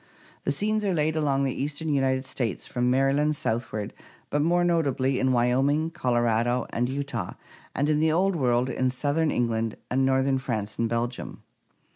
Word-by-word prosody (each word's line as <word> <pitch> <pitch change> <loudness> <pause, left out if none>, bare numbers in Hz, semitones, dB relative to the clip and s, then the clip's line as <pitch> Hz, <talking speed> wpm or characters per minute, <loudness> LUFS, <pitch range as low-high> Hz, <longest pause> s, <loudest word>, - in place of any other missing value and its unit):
The - - +2
scenes 215 +8 0
are 195 -3 +1
laid 155 0 +1
along 140 -3 +1
the 135 -2 0
eastern 145 +3 -3
United 135 -2 +1
States 120 -7 -3
from 125 -1 0
Maryland 135 +4 +2
southward, 110 -5 -3 0.4
but 145 - +1
more 175 +3 +2
notably 140 -6 +1
in 130 0 +2
Wyoming, 135 +6 +2
Colorado, 120 -2 +1
and 125 +1 0
Utah, 135 -8 -3 0.4
and 145 - +1
in 150 -1 +2
the 160 0 +3
Old 185 +4 +2
World 125 -4 +2
in 130 +1 0
southern 145 +5 0
England 115 -4 -1
and 130 +2 +2
northern 135 0 +2
France 110 -5 -4
and 115 -1 +1
Belgium. 120 +1 -3
135 Hz, 165 wpm, -26 LUFS, 120-150 Hz, 0.4 s, the